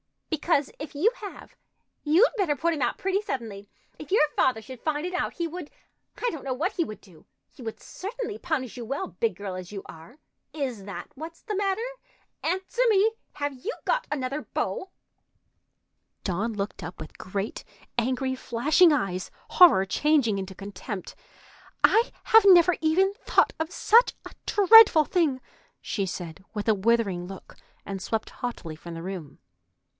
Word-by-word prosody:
"Because 310 Hz, -2 st, +1 dB
if 300 Hz, +1 st, -7 dB
you 375 Hz, +11 st, +3 dB
have, 405 Hz, -2 st, -10 dB, 0.5 s
you'd 330 Hz, +11 st, +5 dB
better 370 Hz, -9 st, +1 dB
put 335 Hz, +5 st, 0 dB
him 300 Hz, -, -4 dB
out 245 Hz, -, 0 dB
pretty 390 Hz, +1 st, 0 dB
suddenly. 220 Hz, -, -5 dB, 0.3 s
If 305 Hz, -, -10 dB
your 400 Hz, -, +5 dB
father 255 Hz, -4 st, +2 dB
should 250 Hz, +2 st, -11 dB
find 305 Hz, 0 st, -1 dB
it 360 Hz, -, -4 dB
out, 365 Hz, -, -1 dB
he 340 Hz, -, -2 dB
would—I 355 Hz, +8 st, -7 dB
don't 315 Hz, -, -7 dB
know 265 Hz, -, -2 dB
what 335 Hz, +9 st, 0 dB
he 345 Hz, -, 0 dB
would 215 Hz, -8 st, -8 dB
do. 175 Hz, -6 st, -19 dB, 0.3 s
He -, -, -14 dB
would 225 Hz, -2 st, -6 dB
certainly 440 Hz, +1 st, -6 dB
punish 290 Hz, -9 st, -2 dB
you 240 Hz, -, -5 dB
well, 275 Hz, +11 st, -3 dB
big 460 Hz, -, -1 dB
girl 200 Hz, -2 st, -6 dB
as 185 Hz, 0 st, -7 dB
you 195 Hz, -2 st, -6 dB
are. 165 Hz, -, -13 dB, 0.4 s
Is 255 Hz, -10 st, -4 dB
that 200 Hz, -, -7 dB
what's 320 Hz, +4 st, -9 dB
the 425 Hz, -3 st, -3 dB
matter? 395 Hz, +2 st, 0 dB, 0.6 s
Answer 380 Hz, +6 st, -2 dB
me! 425 Hz, +1 st, +4 dB, 0.2 s
Have 285 Hz, -1 st, -3 dB
you 375 Hz, -, -5 dB
got -, -, 0 dB
another 275 Hz, 0 st, -2 dB
beau?" 375 Hz, -, -3 dB, 1.3 s
Dawn 210 Hz, +5 st, -1 dB
looked 200 Hz, -1 st, -4 dB
up 175 Hz, 0 st, -8 dB
with 155 Hz, -, -10 dB
great 195 Hz, +3 st, -4 dB, 0.4 s
angry, 260 Hz, +2 st, 0 dB
flashing 285 Hz, +8 st, +3 dB
eyes, 195 Hz, -10 st, -1 dB, 0.2 s
horror 330 Hz, -, +7 dB
changing 250 Hz, -2 st, +2 dB
into 190 Hz, 0 st, -6 dB
contempt. 200 Hz, +1 st, -7 dB, 0.7 s
"I 460 Hz, +2 st, +5 dB
have 445 Hz, -2 st, +6 dB
never 360 Hz, -1 st, +7 dB
even 365 Hz, +5 st, +3 dB
thought -, -, +2 dB
of 320 Hz, +1 st, -2 dB
such 465 Hz, +6 st, +4 dB
a -, -, -9 dB
dreadful 410 Hz, -6 st, +8 dB
thing!" 310 Hz, -8 st, +1 dB, 0.4 s
she 195 Hz, -3 st, -2 dB
said, 175 Hz, -1 st, -6 dB
with 210 Hz, +1 st, -3 dB
a 220 Hz, -, +5 dB
withering 200 Hz, -4 st, +1 dB
look, 195 Hz, 0 st, -11 dB, 0.3 s
and 195 Hz, -1 st, -5 dB
swept 220 Hz, +3 st, -2 dB
haughtily 210 Hz, -10 st, -5 dB
from 170 Hz, +2 st, -9 dB
the 165 Hz, -, -7 dB
room. 180 Hz, -6 st, -7 dB
275 Hz, 165 wpm, -26 LUFS, -, 1.3 s, dreadful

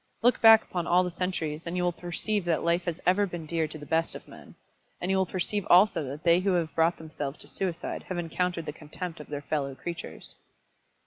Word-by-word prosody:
Look 245 Hz, +1 st, +4 dB
back 225 Hz, -1 st, +9 dB
upon 175 Hz, -1 st, -4 dB
all 180 Hz, +1 st, +4 dB
the 180 Hz, -, -3 dB
centuries, 170 Hz, -3 st, -3 dB
and 170 Hz, +2 st, -3 dB
you 180 Hz, -, +1 dB
will 175 Hz, -, +2 dB
perceive 180 Hz, +4 st, -2 dB
that 170 Hz, -2 st, +1 dB
life 170 Hz, +1 st, +1 dB
has 175 Hz, -1 st, -3 dB
ever 200 Hz, +3 st, +3 dB
been 175 Hz, -3 st, -6 dB
dear 160 Hz, 0 st, 0 dB
to 155 Hz, -, -6 dB
the 145 Hz, -, -10 dB
best 165 Hz, +2 st, 0 dB
of -, -, -10 dB
men. -, -, -14 dB, 0.4 s
And 180 Hz, -, -1 dB
you 190 Hz, -, +3 dB
will 190 Hz, -1 st, +2 dB
perceive 190 Hz, +3 st, -1 dB
also 185 Hz, -1 st, +6 dB
that 140 Hz, +4 st, -7 dB
they 170 Hz, 0 st, +5 dB
who 190 Hz, +1 st, +1 dB
have 165 Hz, -3 st, 0 dB
brought 165 Hz, +1 st, +2 dB
themselves 150 Hz, -3 st, -6 dB
to -, -, -11 dB
suicide 180 Hz, -4 st, -3 dB
have 185 Hz, -, -2 dB
encountered 175 Hz, 0 st, -2 dB
the 150 Hz, -, -4 dB
contempt 160 Hz, +3 st, -7 dB
of 150 Hz, -, -9 dB
their 145 Hz, -1 st, -5 dB
fellow 140 Hz, -3 st, -2 dB
creatures." 170 Hz, +4 st, -7 dB
175 Hz, 230 wpm, -28 LUFS, 160-180 Hz, 0.4 s, back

